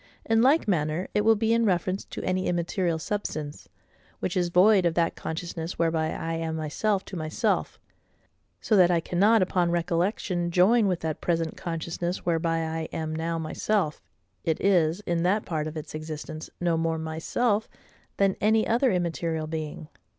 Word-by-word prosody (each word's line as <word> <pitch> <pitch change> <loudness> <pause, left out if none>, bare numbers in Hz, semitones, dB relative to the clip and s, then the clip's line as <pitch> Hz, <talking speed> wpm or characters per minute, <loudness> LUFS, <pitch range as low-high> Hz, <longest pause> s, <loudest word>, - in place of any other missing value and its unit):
In 225 0 +3
like 275 +4 +4
manner 160 -1 0
it 210 - +2
will 225 +1 +5
be 225 +1 +1
in 230 0 +3
reference 185 -1 0
to - - -7
any 185 0 0
immaterial 175 0 0
substance, 155 -5 -4 0.5
which 185 - -2
is 175 -2 +1
void 190 +3 +5
of 170 -2 +1
that 170 -1 +1
consciousness 165 0 -5
whereby 165 -1 +1
I 165 0 -3
am 165 -1 -3
myself 190 +6 -1
to 195 - -8
myself: 155 -2 -1 0.8
so 220 - +1
that 180 -2 +6
I 175 -1 +3
cannot 200 +6 +3
upon 180 -1 +1
recollection 175 +1 0
join 200 +6 +4
with 180 -3 -1
that 160 -1 -3
present 165 -2 -1
consciousness 170 +1 -4
whereby 165 -1 +1
I 160 0 -3
am 155 -1 -3
now 165 +1 -2
myself, 160 +1 -1 0.4
it 160 -1 0
is, 175 -2 +2
in 170 -4 -1
that 195 +5 +1
part 155 -2 -2
of 155 +1 -6
its 155 - -7
existence, 155 0 -6
no 170 -2 +1
more 165 0 0
MYSELF 180 +8 -1 0.5
than 195 -1 +3
any 220 +1 +3
other 245 +2 +3
immaterial 170 -3 -1
being. 155 -1 -5
170 Hz, 165 wpm, -26 LUFS, 160-195 Hz, 0.8 s, that